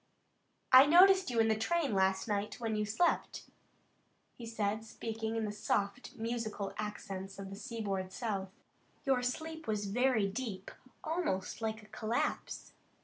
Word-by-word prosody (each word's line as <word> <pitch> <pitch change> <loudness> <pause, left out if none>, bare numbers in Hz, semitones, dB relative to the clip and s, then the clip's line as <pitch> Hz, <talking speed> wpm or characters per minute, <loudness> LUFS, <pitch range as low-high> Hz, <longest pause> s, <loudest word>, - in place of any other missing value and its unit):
"I 260 +2 +10
noticed 375 +3 +7
you 235 -2 0
in 225 - +5
the 220 - +3
train 280 +4 0
last 190 +1 +2
night 205 +1 -2
when 225 -2 -1
you 210 0 0
slept," 225 +12 0 0.9
he 235 - -9
said, 215 -1 -1
speaking 225 0 -4
in 225 -1 0
the 210 - -2
soft, 205 +2 -2
musical 220 -3 -3
accents 195 -2 -5
of 195 -1 -7
the - - -6
seaboard 200 -5 -4
South. 195 -4 -3 0.6
"Your 265 -2 +3
sleep 315 +5 -4
was 210 -1 -1
very 225 0 +2
deep, 200 -2 -5 0.3
almost 315 - -2
like 220 -1 -4
collapse. 220 +2 -2
220 Hz, 145 wpm, -33 LUFS, 200-245 Hz, 0.9 s, I